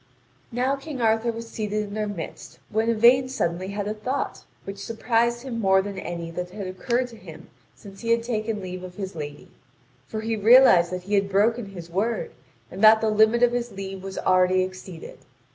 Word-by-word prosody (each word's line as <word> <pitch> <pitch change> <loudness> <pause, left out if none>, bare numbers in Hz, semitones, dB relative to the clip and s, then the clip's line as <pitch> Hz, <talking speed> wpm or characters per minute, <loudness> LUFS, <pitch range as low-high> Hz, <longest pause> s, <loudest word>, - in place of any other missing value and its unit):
Now 255 +3 0
King 275 -1 -7
Arthur 225 0 +2
was 230 0 -7
seated 215 -1 -2
in 205 -1 -8
their 215 0 -2
midst, 185 -6 -7
when 220 +2 +1
Yvain 240 +3 +5
suddenly 180 -7 -2
had 200 +1 -4
a 210 - -1
thought 250 +6 -4 0.2
which 195 0 -7
surprised 235 +1 0
him 245 -4 -4
more 190 -2 +4
than 200 -1 -6
any 170 -1 -5
that 180 +1 -5
had 200 +2 -7
occurred 235 +7 -1
to 235 - -13
him - - -13 0.2
since 195 -2 -13
he 230 - -4
had 230 0 +3
taken 220 -3 -2
leave 185 0 -6
of 180 -1 -9
his 190 -1 -6
lady, 145 -2 -8 0.6
for 215 - -4
he 225 0 -1
realised 215 -5 +6
that 180 0 -4
he 200 +3 -5
had 200 -1 +2
broken 215 +3 +2
his 175 -4 -10
word, 235 - -1 0.4
and 195 - -6
that 220 0 +8
the 220 -1 +1
limit 220 +3 +4
of 245 - +5
his 240 -1 -2
leave 195 -1 -6
was 195 0 -7
already 185 0 +3
exceeded. 185 -2 -9
210 Hz, 200 wpm, -24 LUFS, 190-230 Hz, 0.6 s, that